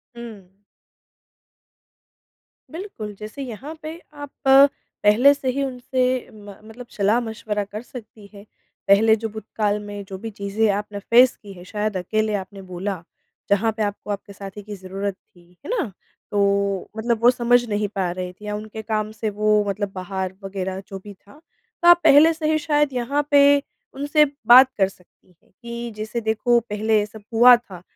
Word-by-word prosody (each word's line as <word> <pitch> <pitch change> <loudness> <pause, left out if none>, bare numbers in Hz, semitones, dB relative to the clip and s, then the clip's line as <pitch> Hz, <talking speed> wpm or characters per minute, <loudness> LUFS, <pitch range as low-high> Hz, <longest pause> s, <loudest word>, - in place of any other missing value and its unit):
हुँ। 210 -6 -11 2.2
बिल्कुल, 320 - -7
जैसे 215 +6 -8
यहाँ 260 +6 -7
पे 315 +2 -7
आप 290 -1 -8 0.7
पहले 240 +7 +6
से 270 -2 -3
ही 280 +2 -2
उनसे 255 -1 -1
म 205 -2 -12
मतलब 235 +3 -12
सलाह-मशवरा 220 0 0
कर 205 +2 -8
सकती 220 -4 -12
हैं। 200 +1 -13 0.4
पहले 220 +3 +5
जो 225 0 -5
भूतकाल 210 -1 -2
में 205 -1 -7
जो 190 -1 -7
भी 225 +3 -6
चीज़ें 205 +2 -1
आपने 205 0 -4
फ़ेस 240 +5 +5
की 200 -1 -10
हैं 175 - -12
शायद 210 0 -3
अकेले 215 +4 -1
आपने 195 0 -7
बोला, 185 0 -5 0.5
जहाँ 205 +3 +2
पे 215 - 0
आपको 205 0 -4
आपके 200 0 -6
साथी 195 +1 -9
की 210 0 -8
ज़रूरत 195 +1 -4
थी। 175 -3 -25
है - - -8
ना? 280 - -2 0.4
तो 200 -1 0
मतलब 230 0 -1
वो 245 - +8
समझ 245 0 +3
नहीं 210 0 0
पा 185 -2 0
रहे 180 0 -5
थे 210 +3 -15
या 210 0 -3
उनके 215 +1 -7
काम 215 0 -2
से 215 0 -3
वो 210 0 +2
मतलब 200 0 -3
बाहर 190 0 -4
वग़ैरह 190 -1 -4
जो 195 -1 -7
भी 205 - -10
था। 205 +9 -20 0.4
तो 345 - +3
आप 345 0 +8
पहले 315 +4 +7
से 315 -1 -1
ही 310 - +2
शायद 295 -3 +1
यहाँ 280 +4 -1
पे 285 0 +6 0.3
उनसे 290 +2 +3 0.2
बात 255 +2 +9
कर 195 -1 +3
सकती 180 -1 -25
हैं - - -32
कि, 235 0 -6
जैसे 220 +2 -4
देखो 225 +2 +2
पहले 215 +1 +1
ये 205 - -1
सब 215 0 -14
हुआ 245 +2 +8
था 195 -7 -10
215 Hz, 175 wpm, -22 LUFS, 200-245 Hz, 2.2 s, बात